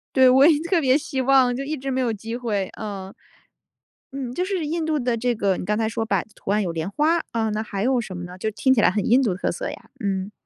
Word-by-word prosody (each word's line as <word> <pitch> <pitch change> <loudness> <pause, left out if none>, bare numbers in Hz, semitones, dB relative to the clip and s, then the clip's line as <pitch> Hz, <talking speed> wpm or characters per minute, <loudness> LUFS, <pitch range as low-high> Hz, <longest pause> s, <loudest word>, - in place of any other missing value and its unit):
对， 260 -1 +7
我 265 +3 +7
也 320 -3 +5
特 340 +1 +1
别 260 0 +4
希 270 -3 -3
望， 260 -2 +4
就 270 - -3
一 305 +2 -3
直 270 0 -4
没 260 0 0
有 245 -2 +1
机 225 +2 -6
会， 210 -6 -2
嗯。 195 -3 -6 1.0
嗯， 260 -3 -5
就 360 +7 -1
是 375 -4 -2
印 325 +2 -2
度 315 -1 0
的 245 -3 0
这 240 +1 0
个 195 -4 +1
你 - - -5
刚 210 +2 0
才 220 -1 0
说 225 0 -2
摆 200 -4 0
的 - - -28
图 - - -10
案 210 +1 +2
有 175 - -2
莲 165 +2 -3
花， 310 +10 +2
啊， 225 -1 0
那 215 0 -2
还 200 -2 -4
有 255 +1 +2
什 195 -5 -5
么 175 - -6
呢？ 180 +1 -9
就 220 - -2
听 215 +5 +2
起 250 - +2
来 - - +5
很 195 +1 -1
印 250 +4 +4
度 215 -9 +1
特 185 - -1
色 - - -4
呀， - - -10
嗯。 195 -2 -2
235 Hz, 300 characters per minute, -23 LUFS, 205-270 Hz, 1.0 s, 对